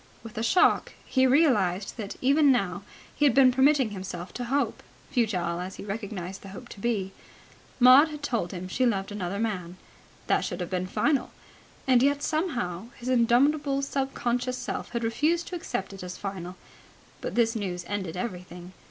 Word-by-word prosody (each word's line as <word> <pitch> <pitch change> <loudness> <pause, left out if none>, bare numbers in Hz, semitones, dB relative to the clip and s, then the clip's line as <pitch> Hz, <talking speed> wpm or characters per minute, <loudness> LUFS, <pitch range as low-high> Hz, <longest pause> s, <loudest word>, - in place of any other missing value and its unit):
With 225 -2 -10
a 220 - -2
shock 295 +11 +3
he 260 0 +3
realized 245 - +2
that 205 -3 -5
even 280 +2 +5
now 195 -6 0 0.3
he - - -1
had 265 -5 +4
been 265 -2 +7
permitting 265 -2 +3
himself 185 -2 -6
to 245 - -4
hope, 275 +4 -1 0.3
futile 180 -8 0
as 185 +2 -5
he - - -8
recognized 195 -3 -5
the - - -11
hope 195 - -10
to - - -11
be. 200 -4 -1 0.7
Maud 255 +5 +8
had 300 -2 -8
told 230 -10 -1
him 185 0 -6
she 220 +7 -1
loved 200 -5 0
another 200 -1 -3
man. 185 -5 -3 0.5
That - - +2
should - - -4
have 180 0 -4
been 185 0 -1
final. 280 +8 +1 0.6
And 255 -3 +5
yet 285 +2 +2
somehow 240 - -2
his 250 0 -5
indomitable 275 +4 +3
sub 275 -1 -2
conscious 245 +1 -1
self - - -4
had 235 -1 -3
refused 310 +9 +1
to 360 - -5
accept 195 - -4
it 195 - -9
as 180 0 -7
final. 185 -2 -6 0.7
But - - -4
this 230 -1 +2
news 180 -5 -3
ended 190 -4 -3
everything. 180 -3 -6
225 Hz, 180 wpm, -27 LUFS, 185-265 Hz, 0.7 s, Maud